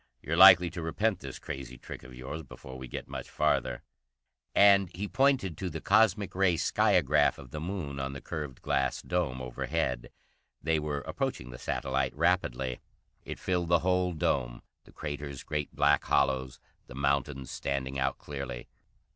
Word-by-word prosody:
"You're 80 - -1
likely 90 -1 +9
to 85 - -5
repent 95 +5 0
this 70 -2 -7
crazy 65 -2 -7
trick - - -9
of 65 0 -12
yours 65 +6 -6
before 65 -2 -11
we 65 0 -7
get - - -6
much - - -7
farther." 60 -1 0 0.7
And 100 -2 +6
he 100 +3 -3
pointed 130 - +2
to 95 - -2
the 80 -1 -5
cosmic 105 +1 +3
ray 95 -2 +3
skiagraph - - +3
of 65 -3 -12
the 75 - -5
Moon 80 -6 -4
on 70 0 -3
the 70 - -6
curved 75 -3 -6
glass 65 -1 0
dome 80 -8 -1
overhead. 65 0 -2 0.5
They 80 0 +1
were 75 -2 -3
approaching 60 -2 -3
the - - -9
satellite 70 +1 -1
rapidly. 70 -7 0 0.5
It - - -6
filled 90 -2 -1
the 85 -1 +5
whole 90 -1 +2
dome, - - -1 0.2
the - - -17
craters 70 -2 -6
great 75 -1 -3
black 75 0 +4
hollows, 65 -1 +1 0.3
the 60 - -11
mountains 70 -1 -1
standing 70 -1 -3
out 65 - 0
clearly. 70 -4 -6
75 Hz, 165 wpm, -30 LUFS, 65-90 Hz, 0.7 s, likely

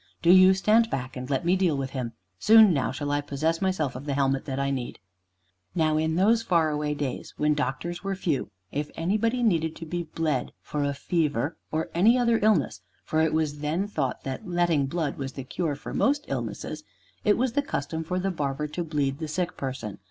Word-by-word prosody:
Do 170 - +6
you 185 +1 +8
stand 220 +4 +3
back, 130 - -4
and 125 0 -6
let 140 +3 0
me 175 +2 +4
deal 180 -6 +2
with 135 -1 -3
him. 125 -4 -4 0.3
Soon 220 -3 +7
now 135 -4 0
shall 145 +2 -3
I 145 0 +1
possess 155 +4 -1
myself 185 -9 0
of 130 +3 -7
the 140 -2 -1
helmet 135 -1 +1
that 135 -2 -3
I 140 0 0
need." 125 -3 -4 0.8
Now, 155 -2 +2
in 160 +1 0
those 220 +6 +4
far 165 -7 +2
away 150 0 -1
days, 140 -4 -4
when 150 0 +2
doctors 150 +6 -3
were 195 0 -2
few, 160 - -1 0.2
if 145 +1 -3
anybody 215 +8 0
needed 165 -7 +1
to 165 - -8
be 175 +2 -3
bled 155 -5 -2
for 150 -1 -2
a 140 0 -1
fever 150 -1 0 0.2
or 160 +1 -2
any 215 +9 +5
other 235 -2 +3
illness 185 - +2 0.2
(for 155 - 0
it 160 -1 +2
was 155 -2 0
then 160 +7 -1
thought 140 -10 -2
that 135 +5 -5
"letting 175 -5 +2
blood" 155 -1 -2
was 135 -1 -4
the 135 - -6
cure 150 +3 -2
for 145 - -8
most 290 +1 +1
illnesses), - - -4 0.4
it 210 - +4
was 250 0 0
the 285 - +2
custom 160 - -3
for 180 +3 -2
the 190 +1 0
barber 150 -3 -2
to 175 +4 -3
bleed 145 -3 -1
the 160 - -3
sick 180 +3 -2
person. 130 -6 -5
155 Hz, 210 wpm, -26 LUFS, 140-180 Hz, 0.8 s, you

